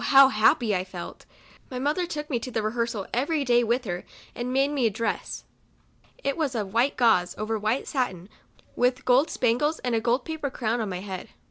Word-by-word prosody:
how 270 -1 +8
happy 225 -2 +3
I 180 - 0
felt. 180 -2 -9 0.4
My 255 - -5
mother 300 +7 0
took 300 -3 -4
me 255 -6 -1
to 255 - -6
the 225 -3 -2
rehearsal 230 -2 -1
every 285 +4 0
day 240 -1 +4
with 240 +2 0
her, 175 -2 -3 0.3
and 245 +1 -4
made 270 +2 +2
me 270 -5 +2
a - - +2
(Jress. 225 +2 -3 0.8
It 275 - 0
was 295 -6 -1
of 205 -3 -3
white 245 +5 +2
gauze, 200 -8 +3
over 215 +1 -2
white 215 +5 -1
satin, 190 - -2 0.5
with 250 +1 +1
gold 260 +5 +4
spangles, 255 +7 +1
and 250 -2 0
a 225 - +2
gold 240 +3 +1
paper 315 -3 -3
crown 235 -2 -1
on 215 - -2
my 180 -1 -4
head. 190 -2 -6
240 Hz, 205 wpm, -26 LUFS, 215-270 Hz, 0.8 s, how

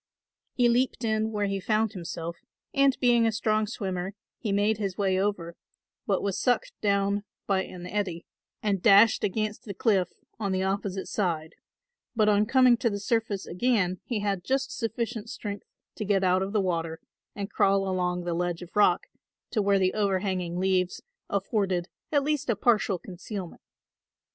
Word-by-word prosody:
He 245 -1 +4
leaped 245 +2 +1
in 220 0 0
where 210 -1 0
he 195 0 -1
found 215 +2 +1
himself 170 -2 -5 0.4
and 275 -1 +4
being 240 -2 +4
a - - +2
strong 215 -1 +1
swimmer 190 -3 -4 0.2
he 215 - -2
made 205 +2 +2
his 195 -3 -2
way 190 -2 +1
over 180 -4 -1 0.5
but 195 -2 +1
was 200 -2 -1
sucked 485 - +1
down 200 0 +1 0.2
by 190 -1 +1
an 180 -1 -9
eddy 180 -4 -3 0.4
and 200 -3 +1
dashed 210 +2 +6
against 215 +1 -2
the 200 -3 -6
cliff 195 -6 +2 0.3
on 200 -3 -1
the 185 0 0
opposite 195 0 -2
side, 165 -5 -1 0.6
but 215 -2 +3
on 210 0 +4
coming 255 -1 +5
to 235 - +1
the 200 -1 -3
surface 220 -2 -1
again 185 -3 +1
he 225 -4 -2
had 200 -3 -1
just 270 +3 -1
sufficient 230 -1 -3
strength 205 -3 -6 0.3
to - - -2
get 200 -2 +2
out 185 0 +3
of 195 +1 -2
the 210 -1 +2
water 165 -3 -2 0.4
and 200 -1 -5
crawl 195 0 +3
along 180 -1 -1
the 175 -1 -2
ledge 175 0 -2
of 175 - -14
rock 205 -4 +4 0.5
to 215 - +1
where 200 0 +3
the 185 -1 +2
overhanging 190 -4 0
leaves 185 -1 0 0.3
afforded 195 -3 0 0.2
at 285 -2 +3
least 295 -2 -1
a 235 - +3
partial 210 -2 +2
concealment. 185 +1 -7
200 Hz, 170 wpm, -27 LUFS, 185-220 Hz, 0.6 s, dashed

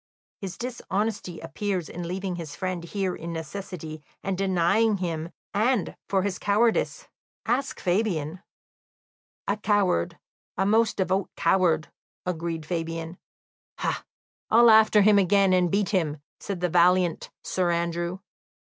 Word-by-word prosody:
"His 190 -2 -6
dishonesty 215 -6 -3
appears 180 +2 -3
in 175 -1 -6
leaving 185 +1 -3
his 165 -4 -7
friend 185 -2 -3
here 190 +1 -2
in 170 +1 -6
necessity, 160 -1 -6 0.2
and 195 -1 -1
denying 195 +3 +2
him; 165 -3 -3 0.2
and 220 0 +1
for 190 -2 +2
his 195 -2 -2
cowardice, 225 - +1 0.4
ask 265 +4 -1
Fabian." 180 -4 0 1.1
"A 200 - +1
coward 205 - +1 0.4
a 195 - +2
most 220 +2 +3
devout 190 0 0
coward," 170 -3 +2 0.4
agreed 165 -2 -3
Fabian. 165 0 -4 0.6
"Ha, - - -2 0.5
I'll 235 +1 +7
after 220 -1 +6
him 210 0 +6
again, 195 0 +4
and 180 -1 +3
beat 200 +2 +1
him," 165 -7 0 0.2
said 195 -3 -5
the 180 - +1
valiant 175 0 +3
Sir 180 -2 0
Andrew. 170 +1 -1
185 Hz, 130 wpm, -26 LUFS, 170-205 Hz, 1.1 s, I'll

